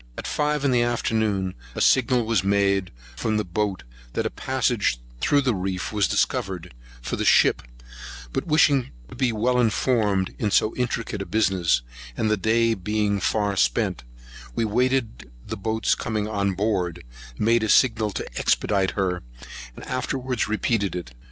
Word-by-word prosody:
At - - -6
five 150 -1 0
in 135 - +3
the 120 -1 +3
afternoon, 110 -5 0 0.2
a - - -3
signal 125 -2 +3
was 110 -5 +1
made 100 -1 +2 0.3
from 110 - -1
the 105 - -1
boat, 95 -2 -2 0.3
that - - -1
a - - -1
passage 120 - 0 0.2
through 145 - +3
the 130 -3 +1
reef 95 0 -3
was 105 -4 +2
discovered 90 -5 -1 0.3
for - - -3
the - - -1
ship; 65 - +4 0.7
but - - -2
wishing 150 -4 +3 0.2
to - - -10
be 130 -1 +1
well 125 +3 +1
informed 110 -4 +1
in 105 - 0
so 110 +2 +2
intricate 120 -4 -2
a - - -4
business, 95 - +1 0.3
and 110 - +1
the - - +4
day 115 +3 +2
being 105 +1 -1
far 105 0 0
spent, - - +1 0.5
we 115 - +1
waited 115 - 0 0.2
the - - -5
boats 110 +3 0
coming 110 -1 -2
on 100 -3 -1
board, 95 -4 -1 0.3
made 115 +2 +3
a 110 - -1
signal 110 -4 +4
to 100 - -5
expedite 100 -3 +1
her, 90 -2 0 0.5
and - - -10
afterwards 130 -1 -2
repeated 110 -2 0
it. 85 -9 -6
110 Hz, 160 wpm, -24 LUFS, 95-120 Hz, 0.7 s, ship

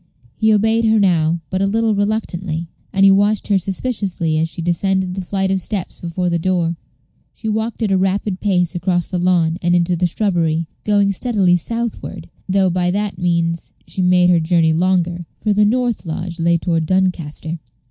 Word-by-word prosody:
He 220 0 +2
obeyed 220 +2 +2
her 220 0 +4
now, 170 -4 +2
but 185 - -1
a 195 - +2
little 225 +2 +1
reluctantly; 195 -5 -2 0.3
and 195 0 +3
he 195 - +7
watched 205 +2 +2
her 200 -2 +3
suspiciously 190 -5 -1
as 165 +1 0
she - - -9
descended 180 +2 0
the 190 - -4
flight 190 +1 -1
of 190 -1 0
steps 195 -1 -4
before 175 +1 -2
the 170 -1 0
door. 170 -1 0 0.6
She 220 - -7
walked 220 +2 -2
at 210 - 0
a 190 - +3
rapid 190 0 -1
pace 180 -4 +1
across 175 0 0
the 180 - -3
lawn, 175 -2 +2
and 175 0 +2
into 175 0 +2
the 175 +1 +1
shrubbery, 170 -4 0 0.2
going 205 -1 +3
steadily 195 -4 +2
southward, 230 +6 -4 0.2
though 190 -1 +3
by 180 0 0
that 200 -1 -2
means 170 -1 -1
she 190 - -4
made 180 0 +4
her 175 - +4
journey 165 -1 +2
longer; 175 0 0
for 210 - 0
the 210 +1 +3
north 240 +1 0
lodge 170 +1 -5
lay 170 +1 +3
toward 165 -2 -1
Doncaster. 170 -3 -1
185 Hz, 185 wpm, -18 LUFS, 170-200 Hz, 0.6 s, he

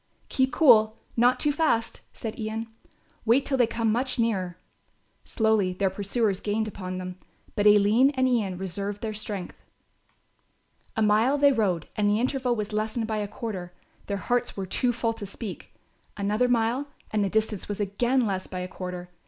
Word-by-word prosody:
"Keep 260 0 +1
cool, 220 -7 +5 0.2
not 245 +2 +4
too 295 - +2
fast," 285 -7 0
said 225 0 -6
Ian, 220 +1 -3 0.6
"wait 240 +5 +3
till 275 - +1
they 245 -3 +4
come 230 -1 0
much 255 +4 0
nearer." 190 -7 0 0.7
Slowly 220 -5 +1
their 190 +1 0
pursuers 200 +1 0
gained 215 +1 -1
upon 185 -3 -5
them, 185 0 -6 0.4
but 205 0 +3
Aline 210 +5 +6
and 260 0 +3
Ian 210 -7 0
reserved 200 +3 -4
their 220 -1 -2
strength. 205 -3 -4 1.4
A 220 - +3
mile 220 +7 +3
they 285 0 +5
rode 195 - 0
and 205 -1 +2
the 210 +1 +2
interval 255 0 0
was 210 -1 -4
lessened 220 +2 -1
by 220 -1 -2
a 205 -1 -2
quarter; 200 -4 -6 0.3
their 200 - -1
hearts 245 +4 -1
were 195 - -2
too 245 +6 +1
full 230 -1 -1
to 215 - -7
speak; 200 +1 -8 0.5
another 210 +5 +1
mile 245 +3 +1 0.2
and 210 -1 +1
the 195 - 0
distance 215 -1 -1
was 205 - -3
again 240 +6 +1
less 190 -3 -2
by 185 -1 -5
a 180 - -4
quarter. 180 -1 -6
215 Hz, 175 wpm, -26 LUFS, 200-240 Hz, 1.4 s, Aline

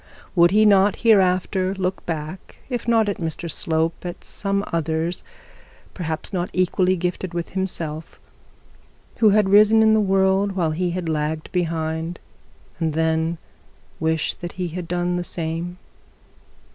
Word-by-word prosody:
Would 170 -1 +6
he 215 +3 +4
not 200 -1 +5
hereafter 190 -2 +3
look 190 0 -2
back, 160 +2 -5 0.2
if 245 -1 -3
not 225 -2 +3
at 200 - -2
Mr 165 0 -4
Slope, 160 0 -1
at 175 0 -7
some 200 0 0
others, 165 +1 -1 0.7
people 160 -4 -3 0.2
not 180 -1 -1
equally 185 0 +2
gifted 180 0 -3
with 170 -1 -3
himself, 165 -5 -4 1.0
who 220 - +6
had 205 -1 +3
risen 215 +2 +6
in 220 0 +5
the 220 - +4
world 195 0 +2
while 170 -4 0
he 175 +3 -1
had 175 0 -3
lagged 155 0 -2
behind, 165 -1 -2 0.6
and 160 -2 0
then 160 +1 0 0.6
wish 160 -1 0
that 175 0 -8
he 180 -2 -3
had 175 +1 -6
done 175 0 -1
the 175 - -2
same? 170 +1 -3
175 Hz, 145 wpm, -22 LUFS, 160-190 Hz, 1.0 s, Would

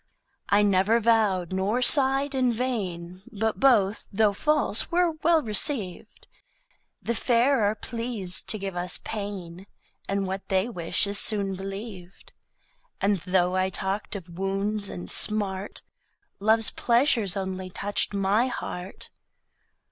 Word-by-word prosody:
I 205 +1 +4
never 200 +3 +2
vow'd 210 -6 +1
nor 205 +7 0
sigh'd 270 +1 +4
in 255 -2 +1
vain 190 -8 -4
But 220 +1 -2
both, 225 -7 +2
thô 205 0 +2
false, 300 -4 +2
were 350 0 +2
well 325 -1 +3
receiv'd. 215 -2 -1 0.8
The 235 - -1
Fair 240 +1 +2
are 205 +1 0
pleas'd 230 -5 -3
to 215 - +2
give 195 -2 -6
us 180 0 +1
pain, 195 -3 -7 0.4
And 195 0 -1
what 190 +1 -6
they 190 +2 +1
wish 175 -4 +1
is 200 0 +1
soon 200 -3 +1
believ'd. 195 -1 -9 0.7
And 200 -1 +1
thô 180 0 +1
I 185 0 +1
talked 190 +3 -3
of 175 -2 -9
Wounds 200 +2 -2
and 90 0 -6
Smart, 205 -2 0 0.6
Loves 220 +2 +3
Pleasures 235 -6 +1
only 190 -1 -5
toucht 205 +3 -1
my 200 +4 +1
Heart. 185 -6 -7
205 Hz, 130 wpm, -25 LUFS, 190-230 Hz, 0.8 s, I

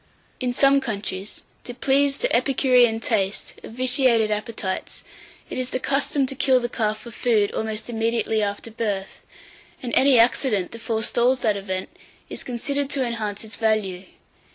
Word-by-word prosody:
849. 250 - 0
IN 245 - -5
SOME 275 0 +5
COUNTRIES, 200 -4 -5 0.2
to 245 - -7
please 275 +2 +2
the - - 0
epicurean 250 -4 +3
taste 200 -4 -1
of - - -10
vitiated 250 -3 +3
appetites, 210 -2 -3 0.4
it - - -5
is 255 0 -2
the 255 - -2
custom 280 +1 +1
to 265 - -5
kill 260 -1 +3
the 240 - -2
calf 215 -3 -1
for 235 - -10
food 215 -3 +1
almost 220 0 -3
immediately 225 -1 0
after 205 +2 -3
birth, 205 -4 -3 0.6
and 240 - -4
any 270 -1 +6
accident 230 -4 +2
that 230 - -9
forestalls 240 +3 0
that 215 -2 +2
event, 190 -2 -4 0.4
is - - -6
considered 280 +3 -2
to 275 -3 0
enhance 220 -4 -3
its 220 0 -7
value. 210 -5 0
230 Hz, 160 wpm, -23 LUFS, 215-255 Hz, 0.6 s, any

